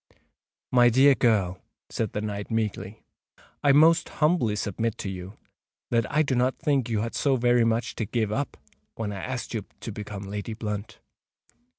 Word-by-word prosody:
"My 120 Hz, -1 st, +6 dB
dear 135 Hz, +4 st, +6 dB
girl," 100 Hz, -8 st, +1 dB, 0.3 s
said 110 Hz, -3 st, -2 dB
the 105 Hz, -, -2 dB
knight 105 Hz, -1 st, -4 dB
meekly, 105 Hz, -2 st, -3 dB, 0.6 s
"I 145 Hz, -, +6 dB
most 160 Hz, +4 st, +5 dB
humbly 150 Hz, -9 st, +1 dB
submit 105 Hz, +2 st, -2 dB
to 95 Hz, -, -4 dB
you 95 Hz, +2 st, -8 dB, 0.5 s
that 115 Hz, -2 st, +1 dB
I 155 Hz, +2 st, +3 dB
do 140 Hz, -, -1 dB
not 125 Hz, +1 st, +1 dB
think 140 Hz, -7 st, 0 dB
you 110 Hz, -2 st, 0 dB
had 115 Hz, +1 st, -3 dB
so 140 Hz, -2 st, +2 dB
very 120 Hz, -1 st, +3 dB
much 115 Hz, +1 st, 0 dB
to 110 Hz, -, -1 dB
give 110 Hz, 0 st, -1 dB
up 135 Hz, +5 st, -2 dB, 0.4 s
when 110 Hz, -2 st, -3 dB
I 100 Hz, -2 st, -5 dB
asked 130 Hz, -1 st, -4 dB
you 110 Hz, -3 st, -2 dB, 0.2 s
to 115 Hz, -, -6 dB
become 105 Hz, -1 st, -7 dB
Lady 105 Hz, +2 st, -5 dB
Blunt." 105 Hz, -1 st, -5 dB
115 Hz, 175 wpm, -26 LUFS, 105-125 Hz, 0.6 s, My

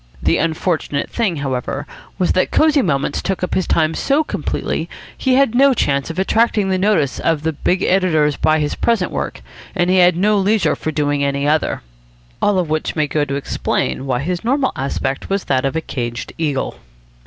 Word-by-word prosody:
The -, -, +2 dB
unfortunate 160 Hz, -3 st, -1 dB
thing, 215 Hz, -8 st, 0 dB
however, 135 Hz, 0 st, -3 dB, 0.3 s
was 185 Hz, -2 st, +1 dB
that 185 Hz, -, +1 dB
Cosy 310 Hz, -2 st, +3 dB
Moments 140 Hz, -, -1 dB
took 190 Hz, -1 st, -2 dB
up 180 Hz, -, -2 dB
his 185 Hz, -, 0 dB
time 160 Hz, -1 st, +2 dB
so 285 Hz, -, +1 dB
completely. -, -, -3 dB, 0.3 s
He 260 Hz, -1 st, +1 dB
had 275 Hz, -4 st, +3 dB
no 270 Hz, +1 st, +5 dB
chance 140 Hz, -7 st, 0 dB
of 165 Hz, -, -6 dB
attracting 210 Hz, +1 st, +2 dB
the 185 Hz, -1 st, +1 dB
notice 185 Hz, -9 st, +1 dB
of 160 Hz, -1 st, 0 dB, 0.2 s
big 185 Hz, +1 st, +2 dB
editors 160 Hz, -6 st, +2 dB
by 155 Hz, +3 st, +2 dB
his 150 Hz, -1 st, -1 dB
present 230 Hz, -6 st, 0 dB
work, -, -, -4 dB, 0.3 s
and 175 Hz, -1 st, +2 dB
he 190 Hz, -, +3 dB
had 180 Hz, -1 st, +5 dB
no 205 Hz, +2 st, +3 dB
leisure 195 Hz, -5 st, +2 dB
for 155 Hz, -, -3 dB
doing 145 Hz, -1 st, 0 dB
any 140 Hz, 0 st, 0 dB
other. 155 Hz, +1 st, 0 dB, 0.6 s
All 205 Hz, -2 st, +2 dB
of 180 Hz, -3 st, 0 dB
which 155 Hz, 0 st, -2 dB
may 155 Hz, -2 st, +2 dB
go 145 Hz, 0 st, 0 dB
to 140 Hz, -, -3 dB
explain 135 Hz, -1 st, -2 dB
why 125 Hz, -1 st, 0 dB
his 175 Hz, +5 st, -3 dB
normal 265 Hz, +3 st, +1 dB
aspect 135 Hz, -1 st, -3 dB
was 195 Hz, 0 st, 0 dB
that 130 Hz, -1 st, 0 dB
of 135 Hz, -, -1 dB
a 160 Hz, -, 0 dB
caged 120 Hz, -5 st, -5 dB
eagle. 145 Hz, -5 st, -2 dB
165 Hz, 190 wpm, -18 LUFS, 145-195 Hz, 0.6 s, no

